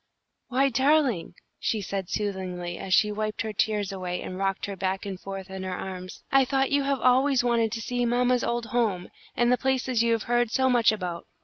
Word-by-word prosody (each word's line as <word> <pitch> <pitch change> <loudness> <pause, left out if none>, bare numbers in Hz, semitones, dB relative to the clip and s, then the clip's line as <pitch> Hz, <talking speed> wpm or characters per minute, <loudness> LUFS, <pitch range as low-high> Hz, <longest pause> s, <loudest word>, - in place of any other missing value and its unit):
"Why, 270 +2 +2
darling," 265 - +2 0.2
she 220 - 0
said, 195 -2 -4
soothingly, 185 -4 -3
as 190 - -6
she 210 +3 +4
wiped 215 +1 -2
her 220 -1 -4
tears 210 -1 0
away 180 -2 -4
and 185 - -6
rocked 195 -1 -1
her 200 - -5
back 190 +1 -2
and 190 -2 -5
forth 195 0 -7
in 190 0 -5
her 185 -1 -3
arms, 185 -1 -7
"I 270 0 +6
thought 270 +2 0
you 285 0 +3
have 275 -1 0
always 260 +1 +4
wanted 230 -2 +2
to 225 - -3
see 245 +1 -1
mamma's 245 +1 +2
old 235 0 -1
home, 220 -7 -1 0.3
and 240 0 +3
the 250 - +3
places 260 -2 +1
you 235 0 +3
have 225 - -1
heard 240 -1 +1
so 260 +2 +2
much 235 -3 +5
about. 180 -5 -4
220 Hz, 210 wpm, -26 LUFS, 190-250 Hz, 0.3 s, I